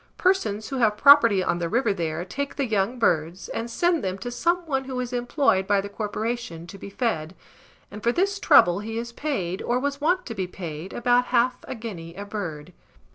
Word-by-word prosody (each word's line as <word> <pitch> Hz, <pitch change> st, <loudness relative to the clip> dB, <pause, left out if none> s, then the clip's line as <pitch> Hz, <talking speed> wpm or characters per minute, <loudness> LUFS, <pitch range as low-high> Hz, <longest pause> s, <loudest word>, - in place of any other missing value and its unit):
Persons 220 Hz, -, +1 dB
who 270 Hz, -, -3 dB
have 215 Hz, -3 st, +2 dB
property 230 Hz, -9 st, +7 dB
on 175 Hz, -, 0 dB
the 170 Hz, -1 st, -2 dB
river 230 Hz, -1 st, +1 dB
there, 165 Hz, -1 st, -3 dB
take 280 Hz, +9 st, -4 dB
the 280 Hz, -, 0 dB
young 220 Hz, +1 st, 0 dB
birds, 170 Hz, -4 st, 0 dB
and 230 Hz, +1 st, -4 dB
send 345 Hz, +4 st, +1 dB
them 190 Hz, 0 st, -2 dB
to 245 Hz, +5 st, -6 dB
some 345 Hz, +8 st, 0 dB
one 270 Hz, -4 st, -1 dB
who 260 Hz, -1 st, -4 dB
is 250 Hz, 0 st, -4 dB
employed 245 Hz, -5 st, +1 dB
by 205 Hz, -1 st, +3 dB
the 200 Hz, +1 st, -4 dB
corporation, 215 Hz, -4 st, -4 dB
to 195 Hz, +3 st, -11 dB
be -, -, -8 dB
fed; 190 Hz, -7 st, -2 dB, 0.6 s
and 210 Hz, -, -8 dB
for 235 Hz, -, +2 dB
this 395 Hz, +7 st, 0 dB
trouble 175 Hz, -, +5 dB
he 225 Hz, +2 st, -5 dB
is 235 Hz, 0 st, -4 dB
paid, 200 Hz, -, -3 dB
or 240 Hz, -, 0 dB
was 285 Hz, +1 st, -3 dB
wont 355 Hz, +5 st, +1 dB
to 230 Hz, -, -5 dB
be 190 Hz, -4 st, -3 dB
paid, 175 Hz, -1 st, -7 dB
about 245 Hz, +1 st, +2 dB
half 250 Hz, 0 st, +2 dB
a -, -, -5 dB
guinea 180 Hz, -8 st, -8 dB
a 200 Hz, +2 st, -6 dB
bird. 180 Hz, -6 st, -6 dB
225 Hz, 210 wpm, -25 LUFS, 190-255 Hz, 0.6 s, property